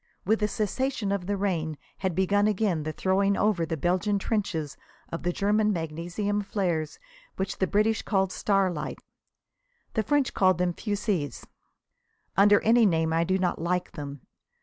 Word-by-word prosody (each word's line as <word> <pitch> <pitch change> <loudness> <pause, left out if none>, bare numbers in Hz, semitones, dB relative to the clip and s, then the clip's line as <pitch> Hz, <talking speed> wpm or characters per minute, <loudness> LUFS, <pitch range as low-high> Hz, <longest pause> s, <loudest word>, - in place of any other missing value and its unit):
With 220 +4 +2
the 210 - +2
cessation 220 +1 -1
of 195 -3 -2
the 205 0 0
rain 165 -6 -1 0.2
had 190 -3 -1
begun 200 +3 +3
again 200 -5 +1
the 155 +1 -3
throwing 195 +4 +1
over 200 -6 +1
the 160 - -2
Belgian 185 +6 +1
trenches 185 -8 -2 0.3
of 165 - -5
the 175 - 0
German 210 +3 +2
magnesium 175 +5 -2
flares, 175 -6 -2 0.4
which 190 +1 -3
the 190 - +2
British 215 +3 +2
call 195 -2 +1
starlights. 190 -5 -1 0.9
The 220 - +1
French 285 +3 +1
call 185 -1 +4
them 180 0 0
fusées. 200 - -2 0.9
Under 205 +1 +6
any 230 0 +5
name 160 -2 +1
I 165 +1 +3
do 185 +2 +1
not 180 -3 -1
like 180 +1 -1
them. 145 -2 -7
190 Hz, 155 wpm, -27 LUFS, 170-205 Hz, 0.9 s, Under